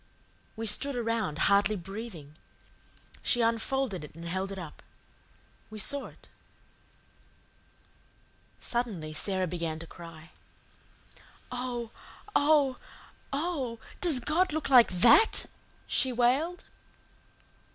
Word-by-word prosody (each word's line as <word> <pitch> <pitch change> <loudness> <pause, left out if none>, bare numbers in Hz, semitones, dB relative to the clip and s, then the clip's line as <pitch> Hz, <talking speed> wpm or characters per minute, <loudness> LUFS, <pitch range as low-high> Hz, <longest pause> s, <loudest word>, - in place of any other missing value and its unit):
We 225 - -4
stood 260 +6 +2
around, 230 -9 -1
hardly 200 +1 +4
breathing. 190 -5 -8 0.9
She 240 - +2
unfolded 230 - 0
it 150 - -11
and 165 +1 -9
held 190 +3 -3
it 195 - -6
up. 165 -5 -9 0.9
We 215 - -9
saw 280 +7 +1
it. - - -18 2.3
Suddenly 205 -11 -3
Sara 185 +3 0
began 165 -2 -3
to 165 - -8
cry. 165 0 -12 1.2
"Oh, 245 -2 -4 0.4
oh, 285 -3 +4 0.5
oh, 275 -6 -2 0.2
does 330 -8 +2
God 325 +8 +1
look 315 -1 -2
like 245 -3 +8
THAT?" 230 - +6 0.4
she 260 - +1
wailed. 265 +9 +1
230 Hz, 100 wpm, -29 LUFS, 180-265 Hz, 2.3 s, like